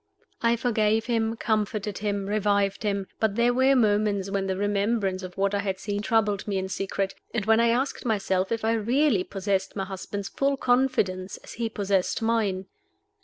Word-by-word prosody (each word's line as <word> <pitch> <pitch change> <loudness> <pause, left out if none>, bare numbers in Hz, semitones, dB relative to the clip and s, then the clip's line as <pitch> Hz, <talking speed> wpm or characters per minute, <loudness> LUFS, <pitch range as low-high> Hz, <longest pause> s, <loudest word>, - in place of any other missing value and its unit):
I 235 0 +3
forgave 220 -2 +1
him, 225 -2 0
comforted 210 -2 -1
him, 205 -1 -1
revived 200 -1 +1
him; 200 -2 -1
but 220 -2 +1
there 240 +1 +3
were 260 +2 +4
moments 205 -4 +2
when 195 -1 -1
the 190 -1 -1
remembrance 205 -1 0
of 185 0 -8
what 195 +1 +1
I 200 - +1
had 195 -1 -2
seen 205 +1 -3
troubled 210 -2 +1
me 200 -2 -1
in 190 0 -2
secret, 195 0 -2 0.2
and 215 -4 0
when 220 +1 +4
I 235 - +4
asked 250 +4 0
myself 195 -4 0
if 225 -1 -1
I 225 - +3
really 230 -1 +2
possessed 195 -1 -2
my 195 -2 -2
husband's 195 +1 -5
full 275 0 0
confidence 215 -8 +1
as - - -10
he 230 0 -2
possessed 200 -3 0
mine. 210 -5 0
205 Hz, 180 wpm, -26 LUFS, 195-225 Hz, 0.2 s, were